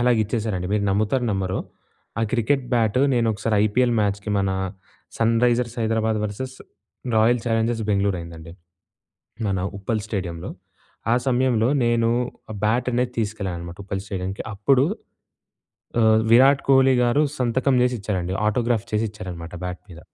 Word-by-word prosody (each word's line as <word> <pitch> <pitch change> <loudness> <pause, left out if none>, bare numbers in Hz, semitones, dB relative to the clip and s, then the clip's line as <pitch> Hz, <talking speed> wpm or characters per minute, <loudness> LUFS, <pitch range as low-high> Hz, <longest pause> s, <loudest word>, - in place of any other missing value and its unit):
అలాగిచ్చేసానండి. 110 -5 0
మీరు 105 -1 +1
నమ్ముతారో 110 +6 +1
నమ్మరో 95 -1 -1 0.6
ఆ - - +1
క్రికెట్ 130 +3 +1
బ్యాట్ 115 0 +2 0.2
నేను 120 -1 +2
ఒకసారి 110 +2 -2
ఐపీఎల్ 120 +3 +2
మ్యాచ్‍‌కి 100 0 -1
మనా 95 -1 +1 0.6
sun 115 0 +3
Risers 120 0 +1
Hyderabad 110 -1 0
versus 130 +6 -5 0.6
royal 115 +2 +4
Challengers 115 0 0
Bengaluru 100 -2 +1
అయిందండి. 85 -1 -10 1.0
మన 95 -1 0 0.2
ఉప్పల్ 105 +3 -2
స్టేడియంలో 90 -4 -4 0.6
ఆ - - +4
సమయంలో 125 -2 +2 0.2
నేను 115 -1 +2 0.4
ఆ - - -5
బ్యాట్ 115 +4 +1
అనేది 125 +1 0
తీసుకెళ్ళాను 105 -5 -2
అనమాట 85 +1 -8
ఉప్పల్ 100 -1 -3
స్టేడియంకి 95 0 -4
అప్పుడు 130 +7 +3 1.2
ఆహ్, 110 -1 +5
విరాట్ 135 +4 +6
కోహ్లీ 135 -1 +6
గారు 120 +5 +3 0.2
సంతకం 130 +2 +1
చేసి 125 0 +2
ఇచ్చారండి 95 -2 -2
ఆటోగ్రాఫ్ 115 0 +1
చేసి 105 +1 +1
ఇచ్చారన్నమాట 90 -5 -8
బ్యాట్ 90 0 -5
మీద. 85 -2 -11
110 Hz, 135 wpm, -23 LUFS, 100-120 Hz, 1.2 s, విరాట్